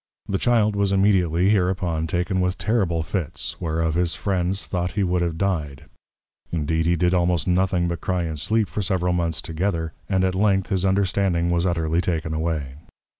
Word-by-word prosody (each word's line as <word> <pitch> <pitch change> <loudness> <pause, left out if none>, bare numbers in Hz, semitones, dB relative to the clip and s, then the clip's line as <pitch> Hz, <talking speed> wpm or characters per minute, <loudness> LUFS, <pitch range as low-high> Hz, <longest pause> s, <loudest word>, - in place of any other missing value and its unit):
The 95 - -1
Child 110 -4 +2
was 100 -1 +1
immediately, 95 -2 +3
hereupon, 90 -5 0
taken 90 +3 -1
with 90 0 0
terrible 95 -8 0
Fits, 85 -2 -4
whereof 80 -1 0
his 85 -1 0
Friends 95 +1 -1
thought 90 -1 -2
he 105 - 0
would 90 -1 +1
have 85 -2 -1
dyed: 80 -8 -2 0.7
Indeed 80 0 0
he 85 - +3
did 90 +1 +1
almost 90 -2 +1
nothing 90 -1 +2
but 85 -1 -3
Cry 90 -2 -1
and 80 -2 -3
Sleep 110 +6 +2
for 105 - -3
several 90 -2 0
Months 85 -2 0
together; 80 -1 -2 0.2
and 95 -2 +2
at 95 0 +1
length 95 0 +1
his 95 -2 +1
Understanding 95 -3 +1
was 85 +1 +1
utterly 80 -1 0
taken 80 -3 -2
away. 80 -4 -2
90 Hz, 175 wpm, -23 LUFS, 80-95 Hz, 0.7 s, immediately